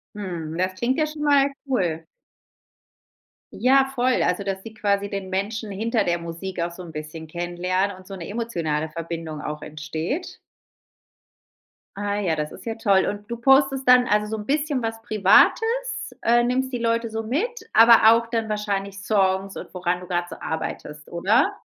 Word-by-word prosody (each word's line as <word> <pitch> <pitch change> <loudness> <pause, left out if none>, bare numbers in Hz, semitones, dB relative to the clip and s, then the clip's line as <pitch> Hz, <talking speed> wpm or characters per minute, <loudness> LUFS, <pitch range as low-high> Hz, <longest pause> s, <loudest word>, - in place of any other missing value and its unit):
Mhm, 170 -6 -5
das 185 +1 0
klingt 250 +8 -1
ja 310 - +3
schon 305 0 -7
mal 285 -1 +4 0.2
cool. 175 - -1 1.5
Ja, 265 +2 +4
voll 250 0 +2
also 180 +2 +1
dass 195 -1 -3
die 225 -1 -10
quasi 200 -1 0
den 195 -2 -5
Menschen 205 +3 -2
hinter 220 +2 0
der 175 0 +1
Musik 170 +2 -6
auch 170 +1 -1
so 180 +2 -9
'n 170 - -10
bisschen 155 +1 -7
kennenlernen 180 +3 -1
und 185 0 -15
so 195 - -8
'ne 175 -3 -7
emotionale 170 -9 -2
Verbindung 165 -1 -5
auch 150 0 -5
entsteht? 160 - -5 1.6
Ah 205 0 -2
ja, 165 -5 0
das 150 0 -3
ist 185 - -12
ja 225 -1 -3
toll, 200 -4 +3
und 205 0 -5
du 235 - -2
postest 270 +1 +3
dann 250 0 +7
also, 210 0 +2
so 220 +1 -3
'n 210 - -7
bisschen 290 -3 0
was 225 0 -3
Privates, 450 - +3
äh, 240 +1 +4
nimmst 260 +1 0
die 245 - -1
Leute 230 0 0
so 225 0 -3
mit, 430 - -2
aber 225 0 +8
auch 230 0 0
dann 225 -2 -1
wahrscheinlich 200 -2 -3
Songs 195 -1 +1
und - - -8
woran 180 0 -1
du 180 - -10
gerade 175 0 -1
so - - -7
arbeitest, 150 -1 -5
oder? 200 - +2
205 Hz, 175 wpm, -23 LUFS, 175-235 Hz, 1.6 s, aber